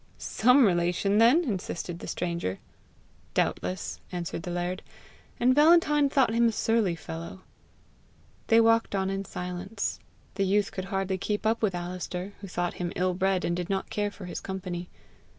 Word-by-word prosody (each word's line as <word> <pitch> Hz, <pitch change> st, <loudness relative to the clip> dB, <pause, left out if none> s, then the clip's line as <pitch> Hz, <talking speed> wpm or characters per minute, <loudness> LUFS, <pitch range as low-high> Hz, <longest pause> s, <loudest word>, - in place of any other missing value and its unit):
"SOME 250 Hz, +3 st, +4 dB
relation 180 Hz, +2 st, +2 dB
then!" 250 Hz, +10 st, +6 dB
insisted 180 Hz, -, -4 dB
the -, -, -8 dB
stranger. 170 Hz, -, -2 dB, 0.8 s
"Doubtless," 185 Hz, -1 st, -1 dB
answered 175 Hz, -2 st, -4 dB
the 175 Hz, -, -6 dB
laird, 175 Hz, +2 st, -2 dB, 0.6 s
and 250 Hz, +2 st, +4 dB
Valentine 300 Hz, -1 st, +5 dB
thought 265 Hz, -5 st, +3 dB
him 235 Hz, 0 st, +4 dB
a -, -, +2 dB
surly 220 Hz, -5 st, +1 dB
fellow. 165 Hz, +3 st, -8 dB, 1.1 s
They 225 Hz, -, +6 dB
walked 225 Hz, -2 st, +3 dB
on 190 Hz, 0 st, 0 dB
in 195 Hz, 0 st, -3 dB
silence. 180 Hz, +4 st, -4 dB, 0.3 s
The 195 Hz, -, 0 dB
youth 200 Hz, +1 st, +2 dB
could 185 Hz, -, -5 dB
hardly 195 Hz, -1 st, -2 dB
keep 210 Hz, +2 st, -2 dB
up 225 Hz, +1 st, +2 dB
with 200 Hz, -5 st, +1 dB
Alister, 180 Hz, +2 st, -5 dB
who 200 Hz, -, -7 dB
thought 175 Hz, -1 st, -2 dB
him 175 Hz, -1 st, -2 dB
ill 185 Hz, 0 st, +1 dB
bred, 190 Hz, 0 st, +1 dB
and 170 Hz, -, 0 dB
did 175 Hz, +1 st, -4 dB
not 195 Hz, -1 st, -2 dB
care 205 Hz, 0 st, 0 dB
for 205 Hz, -2 st, -10 dB
his 180 Hz, -, -5 dB
company. 180 Hz, -2 st, -5 dB
190 Hz, 165 wpm, -28 LUFS, 180-225 Hz, 1.1 s, then